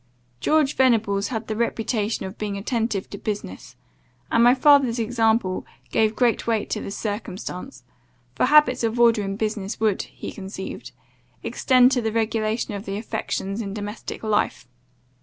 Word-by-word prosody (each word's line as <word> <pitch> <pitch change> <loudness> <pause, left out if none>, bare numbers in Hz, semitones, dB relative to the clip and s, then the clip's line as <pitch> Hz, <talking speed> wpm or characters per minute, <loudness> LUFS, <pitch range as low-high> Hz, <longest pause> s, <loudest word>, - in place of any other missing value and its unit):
George 305 -2 +2
Venables 215 -6 +2
had 225 -3 -4
the 215 - -3
reputation 225 -2 -1
of 190 +2 -8
being 205 -2 -3
attentive 220 -1 -1
to 200 - -7
business, 210 -1 -5 0.6
and 230 - +4
my 245 +2 +6
father's 270 -3 +5
example 225 -4 +1 0.3
gave 220 0 +2
great 240 -2 +1
weight 225 -3 0
to - - -1
this 200 - -6
circumstance; 205 +2 -5 0.5
for - - +2
habits 300 -2 +5
of 230 +1 0
order 230 -2 +5
in 195 -1 -3
business 210 -1 -3
would, 215 -3 +1
he - - -8
conceived, 190 -1 -7 0.5
extend 255 -1 +4
to 255 -2 +1
the 220 -1 -1
regulation 220 0 -1
of 200 +1 -6
the 195 0 -3
affections 215 -1 -3
in 200 -2 -5
domestic 210 +2 -6
life. 210 - 0
220 Hz, 155 wpm, -23 LUFS, 205-235 Hz, 0.6 s, my